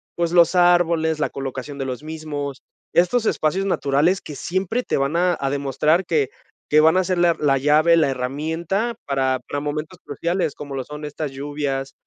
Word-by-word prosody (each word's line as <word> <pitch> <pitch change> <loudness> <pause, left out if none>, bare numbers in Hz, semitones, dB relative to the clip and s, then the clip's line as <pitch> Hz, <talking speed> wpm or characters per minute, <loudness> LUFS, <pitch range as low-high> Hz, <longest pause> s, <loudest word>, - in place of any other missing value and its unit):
pues, 170 -1 0
los 175 0 +5
árboles, 170 -3 +3
la 150 - 0
colocación 135 +1 -6
de 135 - -3
los 130 0 -4
mismos. 150 -3 -5 0.3
Estos 220 +6 +3
espacios 185 +6 0
naturales 160 +2 +2
que 150 - -9
siempre 190 - -1
te - - -1
van 140 +3 0
a 175 0 +2
a 135 -1 -1
demostrar 145 +5 +1
que 150 -6 +1 0.4
que 150 +1 +5
van 160 +3 +5
a 185 - +3
ser 185 -1 0
la 175 -1 +4
la 140 -2 +3
llave, 150 +4 +4
la 155 -4 +3
herramienta 160 - -2
para 130 -2 0
para 145 - -3
momentos 150 +4 -4
cruciales, 170 +2 -2
como 140 -2 -7
lo 135 - -3
son 150 +2 -8
estas 150 0 -5
lluvias 140 -1 -4
155 Hz, 185 wpm, -22 LUFS, 140-170 Hz, 0.4 s, los